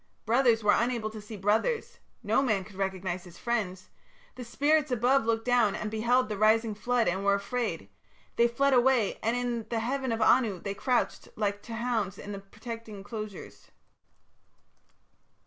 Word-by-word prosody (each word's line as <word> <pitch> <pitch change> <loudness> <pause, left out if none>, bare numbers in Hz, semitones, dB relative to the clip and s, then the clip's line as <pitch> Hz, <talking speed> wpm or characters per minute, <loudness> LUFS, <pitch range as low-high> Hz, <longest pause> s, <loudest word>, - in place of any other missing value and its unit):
Brothers 230 -1 +3
were 205 0 +5
unable 235 -2 0
to 215 -1 -8
see 210 +1 -9
brothers; 445 - 0 0.2
no - - +2
man 215 -8 +1
could 195 +1 -14
recognize 190 -2 -3
his 175 -2 -14
friends.... 190 -6 -3 0.4
The 250 - -8
spirits 295 +5 +1
above 250 0 +2
looked 225 0 0
down 240 -5 +3
and 215 - -4
beheld 235 +3 +2
the 210 -2 -4
rising 220 +1 +3
flood 235 +3 0
and 190 +3 0
were 200 0 +4
afraid: 200 - -3 0.5
they 235 - +4
fled 275 +4 +1
away, 245 -4 +3
and 230 +2 0
in 240 -2 -2
the 235 - -1
heaven 260 +2 -2
of 225 - -1
Anu 215 -3 +3
they 200 +3 -4
crouched 250 +4 -1
like 205 -1 -1
to 230 +1 -7
hounds 225 -4 -1
in 205 - -8
the 200 - -5
protecting 220 +2 -9
enclosures. 210 0 -8
225 Hz, 165 wpm, -29 LUFS, 205-245 Hz, 0.5 s, were